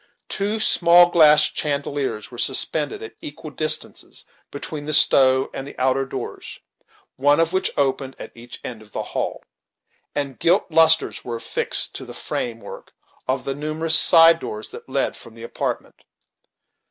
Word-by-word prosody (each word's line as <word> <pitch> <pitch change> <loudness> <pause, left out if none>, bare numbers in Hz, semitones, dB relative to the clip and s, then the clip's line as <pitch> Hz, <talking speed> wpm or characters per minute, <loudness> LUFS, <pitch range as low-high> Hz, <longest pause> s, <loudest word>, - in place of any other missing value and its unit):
Two 205 +2 -2
small 175 -3 +5
glass 150 -3 +6
chandeliers 140 -6 -3
were 120 - -11
suspended 140 +3 -2
at 110 - -9
equal 150 +1 -9
distances 155 +2 -3 0.2
between 145 +1 -7
the 155 - +5
stove 130 -2 +4
and 135 +1 -8
outer 130 +1 0
doors, - - -8 0.6
one 145 +3 +3
of 165 +1 +1
which 190 - 0
opened 135 -1 -1
at - - -10
each 120 +1 -11
end 115 -3 -7
of 105 -1 -19
the - - -3
hall, - - -3 0.7
and 140 -3 -3
gilt 175 +3 +2
lustres 160 0 +3
were 120 - -5
affixed 115 - -1
to - - -7
the - - -11
frame 115 -2 -5
work - - -11 0.3
of 130 0 -2
the 135 - -2
numerous 155 +3 -2
side 165 +1 +7
doors 110 -6 -7
that - - -12
led - - -1
from 115 - -13
the 115 - -12
apartment. 115 - -5
145 Hz, 155 wpm, -21 LUFS, 130-160 Hz, 0.7 s, side